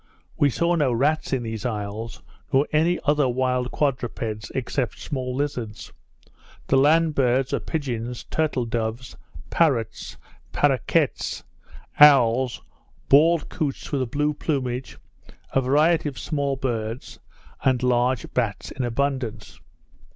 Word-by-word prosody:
We 145 - +3
saw 170 +6 +1
no 150 -6 +2
rats 145 +6 +1
in 130 -3 0
these 110 -1 -5
isles, 110 -1 -5 0.3
nor 135 +1 +4
any 165 +3 +3
other 145 -3 +2
wild 125 0 0
quadrupeds, 120 -6 -2
except 130 0 -2
small 130 -3 -4
lizards. 125 -6 -4 0.7
The - - +1
land 155 +3 +4
birds 130 -1 +1
are - - +1
pigeons, 125 -6 -4
turtle 155 -6 -1
doves, 115 +2 -3 0.4
parrots, 125 -9 0 0.4
parroquets, - - +1 0.6
owls, 130 -4 +5 0.5
bald 160 +3 +5
couts 145 -5 -4
with 140 -3 0
a 130 - -1
blue 150 +5 0
plumage, 130 -4 -3 0.6
a 135 - +3
variety 150 +4 +2
of 140 - -12
small 140 -3 -1
birds, 120 -3 -4 0.4
and 130 -2 +2
large 125 -1 +1
bats 115 -5 -2
in 130 - -4
abundance. 120 -3 -3
130 Hz, 120 wpm, -24 LUFS, 120-145 Hz, 0.7 s, owls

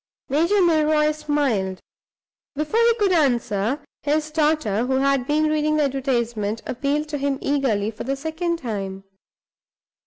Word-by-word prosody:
Major 340 +8 +3
Milroy 310 -2 +3
smiled. 285 -11 -1 0.8
Before 305 +10 0
he 465 0 +4
could 410 -4 +1
answer, 245 - +1 0.2
his 305 +1 0
daughter, 300 -8 +1
who 265 - +1
had 275 -1 +1
been 300 +1 +2
reading 305 0 +1
the 300 - +3
advertisement, 235 -6 -1
appealed 285 +4 -1
to 295 -2 -3
him 275 0 0
eagerly, 240 -7 0
for 215 - -7
the 270 +3 -1
second 320 +4 -2
time. 195 -8 -5
285 Hz, 135 wpm, -22 LUFS, 240-310 Hz, 0.8 s, he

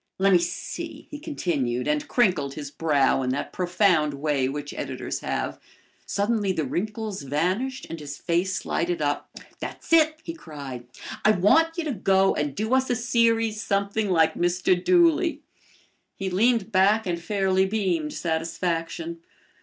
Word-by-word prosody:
"Let 195 0 +4
me 180 - +6
see," 170 0 -5
he 295 - -6
continued, 145 - -2
and 150 0 0
crinkled 180 - +1
his 145 -2 -6
brow 145 -4 +2
in 130 - -1
that 135 +3 -3
profound 180 -5 +2
way 140 -2 0
which 145 +1 -5
editors - - -4
have. - - -3 0.5
Suddenly 205 -1 0
the 160 -4 -1
wrinkles 210 - -3
vanished 185 - -1
and 165 - -7
his 145 -1 -7
face 175 +1 -1
lighted 175 +1 -1
up. 145 -1 -1 0.3
"That's - - -6
it," 315 -1 +5
he 330 - -5
cried. 140 - -8 0.4
"I - - +5
want 320 - +4
you 340 - -1
to 310 - -2
go 195 -1 +3
and 145 -2 -2
do 220 +4 -1
us 260 0 +2
a 245 - +2
series 230 -2 +1
something 200 +1 0
like 160 -3 +3
Mr. 175 +1 +2
Dooley." 335 -3 +3 0.7
He 195 -1 -4
leaned 225 +2 +2
back 205 +3 +4
and 170 -2 -2
fairly 190 +1 +1
beamed 185 -7 -1
satisfaction. 165 0 -2
185 Hz, 155 wpm, -25 LUFS, 155-220 Hz, 0.7 s, me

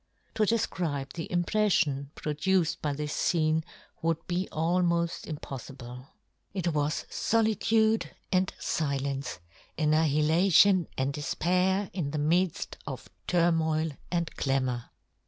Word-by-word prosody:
To 215 - +2
defcribe 165 -11 -1
the 165 - -5
impreflion 175 -6 +1
pro 150 - -3
duced 180 +2 +1
by 145 -2 -1
this 150 +1 -3
fcene 160 -1 +2 0.4
would 165 -1 +1
be 180 +2 -2
almoft 170 0 0
impoflible. 130 -3 -8 0.5
It 180 -3 0
was 150 0 0
folitude 220 0 +2 0.2
and 185 0 +2
filence, 140 - -2 0.4
annihilation 160 +4 +4
and 135 +1 0
defpair 180 +6 0
in 170 -6 -2
the 155 - -3
midft 165 +4 0
of - - -7 0.2
turmoil 160 -2 +2 0.2
and 170 -2 -2
clamour. 130 -3 -1
160 Hz, 110 wpm, -29 LUFS, 145-180 Hz, 0.5 s, annihilation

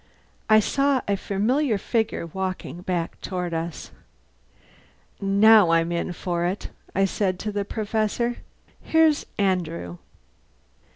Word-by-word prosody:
I 215 0 +7
saw 275 +4 +1
a 200 - +2
familiar 220 +6 0
figure 220 -2 -1
walking 185 0 -5
back 180 -2 -3
toward 180 -3 -3
us. 165 0 -4 1.3
"Now 200 0 +6
I'm 165 0 +2
in 170 +1 -2
for 175 0 -2
it," 180 +3 -3 0.2
I 195 +1 +3
said 190 -1 -1
to 215 - -3
the 205 -1 -2
Professor. 220 +3 -1 0.4
"Here's 320 -2 +3
Andrew!" 170 - -1
195 Hz, 115 wpm, -24 LUFS, 175-220 Hz, 1.3 s, I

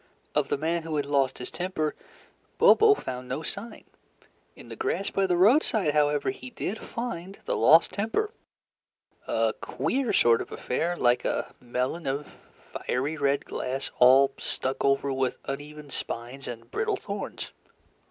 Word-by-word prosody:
Of - - +1
the - - +1
man 165 +3 0
who 160 -1 -4
had 145 -1 0
lost 140 -2 +1
his 125 - -6
temper, 160 -2 -2 0.6
Bobo 430 -1 +7
found 125 - -6
no 135 +5 -3
sign. 205 +8 -5 0.7
In - - -13
the - - -7
grass 400 - -1
by 195 -1 +1
the 180 -1 +2
roadside, 210 - +4
however, 150 - +2
he 390 -10 -10
did 220 -3 -4
find 200 -6 -5
the - - 0
lost 165 +1 +6
temper 225 - -1 1.0
a - - +1
queer 260 -3 -1
sort 115 -1 +4
of - - -8
affair 170 +7 -2
like 120 0 +3
a - - -2
melon 125 +6 -2
of 140 +2 -2 0.5
fiery 140 +5 -2
red 140 -2 +1
glass 135 +2 -4
all 135 +2 +7
stuck 130 +1 -3
over 140 0 +2
with 130 -1 -1
uneven 145 +1 -7
spines 125 +4 -5
and 115 -1 -8
brittle - - 0
thorns. - - -6
150 Hz, 150 wpm, -27 LUFS, 135-190 Hz, 1.0 s, Bobo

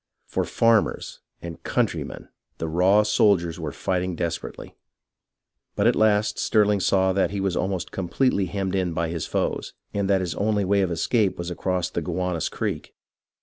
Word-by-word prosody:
For - - -2
"farmers" 115 -2 +1 0.2
and 85 -1 -7
"country - - 0
men" - - -10 0.3
the 80 - -3
raw 95 +6 +4
soldiers 100 -5 +2
were 80 -3 -4
fighting 90 +1 -2
desperately; 85 0 -5 1.0
but - - +1
at - - +4
last 110 0 +2
Stirling 105 -2 +3
saw 95 0 +2
that 95 -2 +2
he 100 +1 -4
was 95 -2 0
almost 95 -1 -2
completely 95 +2 0
hemmed 95 0 -3
in 90 -3 0
by 85 0 -1
his 85 -1 -3
foes, - - -2 0.2
and 100 -1 -1
that 95 -1 +3
his 90 -3 -2
only 105 +1 0
way 100 +1 +2
of 95 - +1
escape 95 +5 +1
was 85 0 -4
across 90 0 -1
the - - -2
Gow 90 +1 -2
anus 85 -3 -1
Creek. - - -4
95 Hz, 175 wpm, -24 LUFS, 85-100 Hz, 1.0 s, raw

